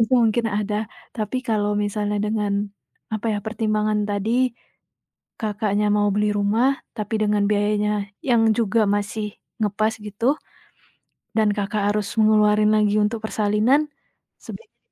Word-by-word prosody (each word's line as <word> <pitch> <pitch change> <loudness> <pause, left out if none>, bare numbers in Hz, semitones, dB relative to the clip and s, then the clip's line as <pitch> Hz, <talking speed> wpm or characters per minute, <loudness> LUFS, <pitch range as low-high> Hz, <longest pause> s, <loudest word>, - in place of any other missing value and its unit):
Itu 225 +2 +1
mungkin 225 +1 +1
ada 210 0 -1 0.4
tapi 215 +3 -2
kalau 210 -2 +1
misalnya 205 0 -2
dengan 210 -1 -1 0.6
apa 215 +1 -3
ya - - -1
pertimbangan 215 -1 0
tadi 205 +2 -1 1.1
Kakaknya, 210 -1 0
mau 205 0 +2
beli 210 +1 +1
rumah, 215 +5 +2 0.3
tapi 215 +1 -3
dengan 210 -1 +2
biayanya 210 0 +1 0.4
yang 235 -2 +4 0.2
juga 225 0 +2 0.2
masih 210 +1 -3 0.4
ngepas 215 +2 +1
gitu, 210 +3 -6 1.1
dan 215 -1 +4
Kakak, 205 +1 -1
harus 210 -1 -1
ngeluarin 210 0 +4
lagi 210 -1 +2
untuk 220 +1 -1
persalinan 215 +6 +2 0.6
sebaiknya 460 - -11
210 Hz, 125 wpm, -22 LUFS, 205-220 Hz, 1.1 s, yang